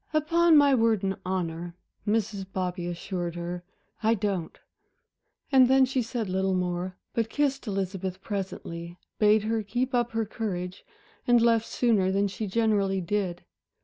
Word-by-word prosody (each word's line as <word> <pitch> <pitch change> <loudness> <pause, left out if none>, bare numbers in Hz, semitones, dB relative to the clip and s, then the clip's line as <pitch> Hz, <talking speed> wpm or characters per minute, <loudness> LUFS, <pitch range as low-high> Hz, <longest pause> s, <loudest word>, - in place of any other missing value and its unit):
"Upon 325 +2 +4
my 285 -1 +6
word 225 -5 +3
and 195 0 0
honor," 175 -2 -3 0.3
Mrs. 210 -2 0
Bobby 180 -2 -2
assured 175 0 -4
her, 175 +1 -5 0.4
"I 225 +1 +3
don't." 195 -5 -2 0.9
And 260 -2 +7
then 265 +1 +5
she 260 0 0
said 230 -2 -3
little 190 0 0
more, 180 0 -2 0.2
but 230 -1 0
kissed 275 -1 0
Elizabeth 190 -2 -3
presently, 175 -4 -5 0.2
bade 210 0 +5
her 225 +1 0
keep 245 +6 -2
up 240 -1 +1
her 225 0 0
courage, 185 -4 -4 0.4
and 240 -1 +6
left 230 -1 +3
sooner 210 -6 +2
than 200 +1 +2
she 200 +2 -4
generally 200 -2 +1
did. 180 -1 -2
200 Hz, 150 wpm, -27 LUFS, 185-230 Hz, 0.9 s, And